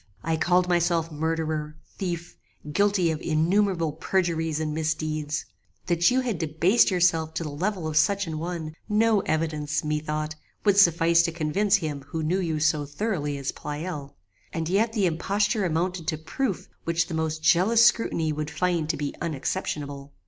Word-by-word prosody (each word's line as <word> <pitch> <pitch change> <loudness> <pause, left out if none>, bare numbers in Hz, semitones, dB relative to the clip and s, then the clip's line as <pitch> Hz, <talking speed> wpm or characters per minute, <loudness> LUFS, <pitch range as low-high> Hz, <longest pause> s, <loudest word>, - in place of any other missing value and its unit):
I 165 0 0
called 180 +2 +2
myself 170 -2 +1
murderer, 155 -1 -2 0.2
thief, 175 -2 -4 0.4
guilty 200 -2 +3
of 155 - -4
innumerable 165 +1 +1
perjuries 165 -2 0
and 155 -1 -2
misdeeds: 155 -1 -2 0.4
that 175 0 +3
you 255 +1 +2
had 235 -9 -2
debased 165 +8 +3
yourself 165 -4 +2
to 165 - -1
the 150 - -5
level 180 +3 -2
of 155 - -4
such 200 +6 +3
an 160 -2 -4
one, 165 -2 -4 0.2
no 215 0 +3
evidence, 155 -4 -1
methought, 155 0 -2 0.3
would 200 -1 +5
suffice 170 -2 +5
to 170 0 0
convince 175 +6 +1
him 155 -7 -2
who 160 +2 -3
knew 175 +5 +1
you 160 -4 -1
so 155 -1 +2
thoroughly 150 -3 -2
as 140 -1 -3
Pleyel; 150 -1 -6 0.4
and 165 -1 -3
yet 220 +5 +2
the 210 -4 +1
imposture 200 +5 0
amounted 170 0 -1
to 155 - 0
proof 190 - -3 0.2
which 165 0 +1
the - - -7
most 160 -1 -2
jealous 220 +9 +5
scrutiny 165 -9 +2
would 150 0 -3
find 170 -2 0
to - - 0
be 145 -1 -3
unexceptionable. 145 -3 -3
165 Hz, 165 wpm, -26 LUFS, 155-185 Hz, 0.4 s, would